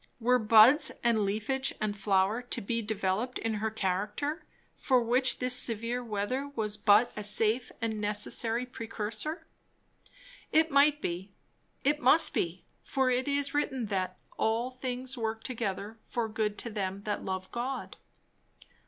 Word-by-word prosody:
were 250 +2 +3
buds 225 +6 +6
and 235 -2 +3
leafage 220 +7 0
and 210 -1 -2
flower 195 +2 +1
to 245 - -4
be 230 +3 -2
developed 210 +3 -2
in 225 -1 -2
her 220 - 0
character, 210 - -2 0.3
for 255 -2 +2
which 250 +3 +2
this 250 0 +3
severe 235 +1 0
weather 235 +5 -2
was 215 -2 -1
but 210 +2 +4
a 210 - -4
safe 220 +4 0
and 220 -2 -2
necessary 225 +3 +1
precursor? 230 - -4 1.1
It 320 0 +3
might 290 +1 +4
be; 185 +3 -4 0.5
it 295 +2 +2
must 305 +5 +6
be; 175 +2 -2 0.2
for 265 -1 +1
it 255 +2 0
is 280 0 +2
written 270 -4 -1
that 185 -1 -2 0.2
"all 230 +3 0
things 255 0 -3
work 220 0 -3
together 220 -2 -4
for 235 -2 -3
good 215 -1 -2
to 235 - -3
them 200 -1 -3
that 210 -1 -3
love 185 0 -4
God." 250 +2 -4
225 Hz, 145 wpm, -30 LUFS, 210-255 Hz, 1.1 s, buds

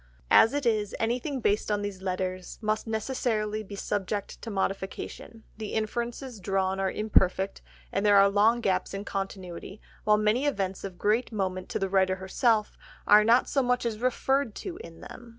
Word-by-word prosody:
As 225 - +6
it 290 -2 -1
is, 215 -3 +1
anything 250 +4 -1
based 210 0 +1
on 205 -1 0
these 200 -2 -5
letters 185 -1 -3
must 215 0 -1
necessarily 220 -2 -1
be 205 -1 -9
subject 200 +1 -3
to 230 - -6
modification, 195 +3 -4
the 215 -1 -5
inferences 235 +2 -3
drawn 190 0 0
are 195 0 +1
imperfect, 195 -2 +1 0.3
and 195 - -1
there 205 -1 +6
are 195 0 +7
long 215 +4 +3
gaps 190 -1 0
in 200 +1 -5
continuity, 195 0 -5 0.2
while 210 0 +4
many 215 +7 +2
events 195 -8 -2
of 190 -2 -6
great 220 +7 +1
moment 185 -3 -3
to - - -1
the 195 - -1
writer 190 -1 +2
herself 210 +3 0 0.3
are 210 +1 +7
not 235 +3 +4
so 275 - +1
much 250 -1 +1
as 220 -2 -2
referred 255 0 0
to 370 -3 -6
in 165 -1 -11
them. 240 0 -11
210 Hz, 175 wpm, -28 LUFS, 195-230 Hz, 0.3 s, are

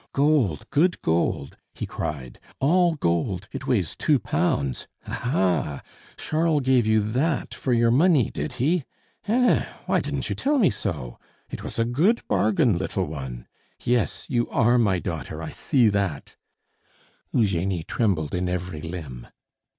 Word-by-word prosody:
"Gold, 135 - +2
good 170 +4 +2
gold!" 80 -4 0 0.2
he - - -4
cried. 65 -5 -5 0.2
"All 170 +4 +3
gold, 90 - -1
it 135 0 -6
weighs 105 - 0
two - - +3
pounds! 70 -3 -1 0.2
Ha, - - -7
ha! 90 - 0 0.4
Charles 155 -2 +1
gave 130 -3 +3
you 110 0 +4
that 130 +9 -1
for 130 - -3
your 115 -1 +4
money, 150 -1 +4
did - - -4
he? 155 +6 +1 0.4
Hein! 245 +4 +3 0.2
Why - - +2
didn't - - -3
you - - -2
tell 290 +2 +1
me 210 -10 +4
so? 75 - -4 0.3
It - - -5
was - - -7
a 115 - +2
good 165 - +1
bargain, 105 -2 +2
little - - -1
one! 65 -5 -6 0.4
Yes, 120 -3 0
you 120 -3 0
are 120 -1 +3
my 100 -5 +3
daughter, 80 -4 -5
I 80 -1 -5
see 125 -5 +2
that 100 -8 -2 0.5
" - - -36
Eugenie 95 -5 +1
trembled 85 -8 0
in 90 0 -1
every 90 -3 -4
limb. 75 -8 -7
110 Hz, 150 wpm, -24 LUFS, 85-135 Hz, 0.5 s, you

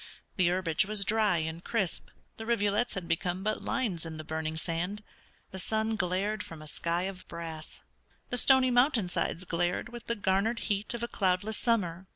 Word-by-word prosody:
The 185 -3 +4
herbage 180 -1 +1
was 210 -2 0
dry 215 -3 +3
and 160 +1 -3
crisp, 195 -8 -1 0.3
the 225 - -7
rivulets 215 0 +2
had 180 -3 -4
become 180 +3 0
but 215 +1 0
lines 225 -12 -1
in 160 -1 -5
the 155 - -5
burning 160 0 -3
sand; 175 +6 -2 0.5
the 190 - -5
sun 220 +3 0
glared 200 +2 0
from 165 -5 -8
a 155 - -10
sky 170 +3 -1
of 190 -1 -5
brass; 165 -2 -7 0.5
the - - +1
stony 260 0 +6
mountainsides 235 - +2
glared 175 +5 0
with 240 0 -9
the 235 - +1
garnered 200 +3 +1
heat 205 +3 0
of 235 - -4
a - - 0
cloudless 200 +1 +1
summer. 190 -6 0
190 Hz, 180 wpm, -30 LUFS, 170-220 Hz, 0.5 s, stony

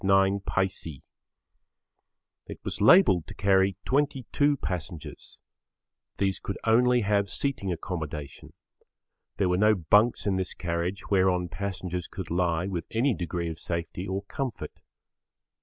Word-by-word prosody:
13 95 +1 +3
9. 90 -7 -2 1.5
It - - -8
was - - -4
labelled 105 - +6
to - - -9
carry 95 -1 +3
22 145 +1 +1
passengers. 80 - -6 0.8
These 95 -2 0
could 100 - -5
only 125 +2 +4
have 100 -1 +1
seating 135 -9 -1
accommodation. 80 -5 -6 0.8
There 95 - +2
were 90 - +2
no 105 +2 +5
bunks 105 +7 +3
in 100 -2 +1
this 95 -1 -3
carriage 85 +4 -3
whereon 95 -2 +2
passengers 90 -3 -4
could 95 -4 -7
lie 85 -1 +1
with 90 -4 -3
any 120 +4 +2
degree 85 -2 -3
of 80 - -8
safety 85 +2 -4
or 95 +1 -3
comfort. 130 +4 -5
95 Hz, 125 wpm, -27 LUFS, 85-105 Hz, 1.5 s, labelled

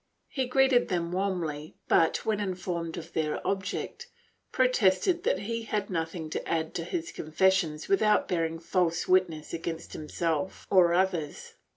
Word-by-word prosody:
He 260 -3 -2
greeted 265 -1 +4
them 170 -2 -1
warmly 175 -6 -2
but, 165 - +3
when 215 -2 +1
informed 180 -4 -3
of 170 - -8
their 155 -1 -1
object, 200 - -3 0.4
protested 255 - +3
that 190 - +1
he 230 +3 -3
had 210 -3 -3
nothing 165 -1 -3
to - - -4
add 160 -1 -1
to 165 - -3
his 340 - -4
confessions 160 -1 +1
without 210 +2 +3
bearing 165 -2 -1
false 170 0 0
witness 180 -4 +1
against 165 0 -5
himself 160 +3 -2
or 175 -3 +5
others. 175 -5 -1
180 Hz, 145 wpm, -28 LUFS, 165-200 Hz, 0.4 s, or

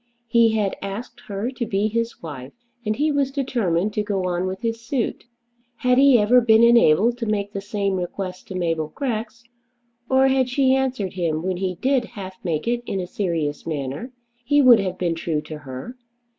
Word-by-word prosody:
He 230 -1 +3
had 205 -3 0
asked 200 +5 -6
her 205 +5 -3
to 250 -2 -3
be 200 +1 +1
his 230 -1 -3
wife, 135 -4 -8 0.3
and 215 -1 -1
he 300 +4 +1
was 280 -2 +1
determined 215 - -1
to 210 - 0
go 200 -3 -2
on 180 +1 -1
with 190 +2 -5
his 230 -1 -2
suit. 240 -1 -2 0.5
Had 250 +1 +2
he 275 -2 +7
ever 235 +4 +5
been 225 -1 +5
enabled 235 0 +5
to 230 - -3
make 205 -1 -1
the 200 - -3
same 200 -1 -1
request 185 +1 -5
to 190 - -7
Mabel 165 -3 -1
Grex, 235 -4 -3 0.7
or 265 0 +4
had 260 -1 +2
she 260 0 +3
answered 260 -8 -1
him 165 -3 -1
when 185 -1 -1
he 185 -1 -2
did 260 +5 +1
half 190 -4 -10
make 165 0 -2
it 240 0 0
in 195 - -2
a 180 - -2
serious 165 -7 -2
manner, 145 - -4 0.3
he 290 +4 +3
would 255 -5 +7
have 190 -2 -2
been 175 -2 0
true 165 -2 -2
to 155 0 -8
her. 140 - -8
210 Hz, 195 wpm, -22 LUFS, 180-240 Hz, 0.7 s, he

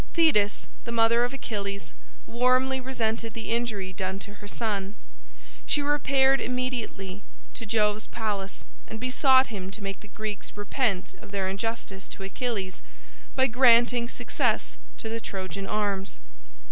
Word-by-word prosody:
Thetis, 285 - +4 0.2
the 235 - -5
mother 235 +1 +4
of 245 - 0
Achilles, 200 - -4 0.3
warmly 255 +2 +3
resented 230 -3 -1
the 225 -1 -4
injury 215 -5 -1
done 190 0 -2
to 205 - -7
her 205 - -8
son. 205 -2 -2 0.7
She 290 - +2
repaired 275 -2 +4
immediately 240 -6 -2 0.3
to 225 - -7
Jove's 210 0 +2
palace 205 -4 -3 0.2
and 220 - -6
besought 260 0 +4
him 190 -2 -4
to 200 +1 -7
make 195 0 -4
the 210 - -13
Greeks 215 0 -5
repent 205 - 0
of - - -12
their 195 -1 -1
injustice 195 0 -3
to 195 - -7
Achilles 195 -2 -3 0.5
by 260 - +5
granting 240 -1 +5
success - - 0 0.2
to - - -5
the 225 +1 -2
Trojan 195 0 -4
arms. 200 -2 -1
220 Hz, 140 wpm, -27 LUFS, 200-250 Hz, 0.7 s, by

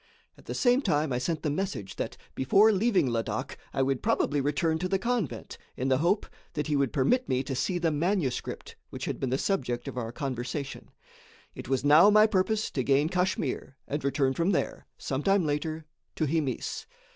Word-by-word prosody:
At - - -19
the - - -5
same 250 +1 +3
time 150 - +1
I 125 - 0
sent 155 +4 -2
the 150 - 0
message 150 - -3
that - - -4 0.2
before 195 +12 +5
leaving 205 - +2
Ladak 115 -1 -3
I 135 - +1
would 135 -1 0
probably 145 -1 +1
return 160 +3 0
to 185 - -1
the 195 - +2
convent, 230 - -3 0.2
in 130 +1 -1
the 130 0 +3
hope 175 +6 +2 0.3
that 150 - -2
he 150 - 0
would 140 -4 +1
permit 195 - +1
me 130 0 +1
to 135 - -4
see 135 +8 -1
the 170 -2 +1
manuscript 155 -3 -2
which - - -6
had - - -3
been 130 - -1
the 130 - +1
subject 125 -10 -1
of 125 - -4
our 115 -1 -4
conversation. 135 +2 -4 0.6
It - - -9
was 135 0 0
now 155 +7 +8
my 215 +1 +7
purpose 215 +1 +1
to 130 - -1
gain 140 +4 +3
Kachmyr 180 -7 -1
and 145 0 -3
return 135 -1 +1
from 170 +7 +1
there, - - -2
some 135 0 -3
time 195 0 +3
later, 155 +2 -2 0.3
to 155 - 0
Himis. 150 -3 -2
150 Hz, 195 wpm, -28 LUFS, 135-185 Hz, 0.6 s, now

